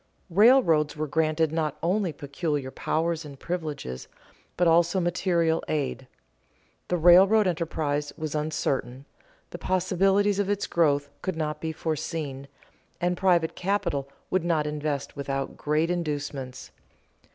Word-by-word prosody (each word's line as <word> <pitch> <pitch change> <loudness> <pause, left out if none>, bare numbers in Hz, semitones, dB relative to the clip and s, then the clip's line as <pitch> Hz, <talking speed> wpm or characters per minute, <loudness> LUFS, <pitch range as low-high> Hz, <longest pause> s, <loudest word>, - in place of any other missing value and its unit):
_ - - -40 0.3
Railroads 170 - +4
were 155 - -1
granted 155 +1 +1
not 155 -3 -1
only 185 +1 +1
peculiar 145 -1 -3
powers 165 +3 -1
and 140 -3 -11
privileges, 150 - -5 0.5
but 175 - +3
also 170 +3 +4
material 170 -2 +1
aid. 135 -3 -2 0.8
The 180 - 0
railroad 190 +6 +6
enterprise 155 -4 -1
was 155 -2 -4
uncertain, 140 -4 -2 0.5
the - - -7
possibilities 195 +2 +2
of 200 -1 0
its 205 -1 0
growth 145 -4 +2
could 185 - -2
not 150 -2 -3
be 160 - -2
foreseen, 155 -3 -4 0.5
and 175 0 +1
private 175 -3 +2
capital 175 -8 -1 0.2
would 185 -2 +1
not 165 -3 +1
invest 150 -1 -3
without 135 -1 -3
great 155 +3 0
inducements. 145 -6 -4
160 Hz, 130 wpm, -26 LUFS, 145-175 Hz, 0.8 s, railroad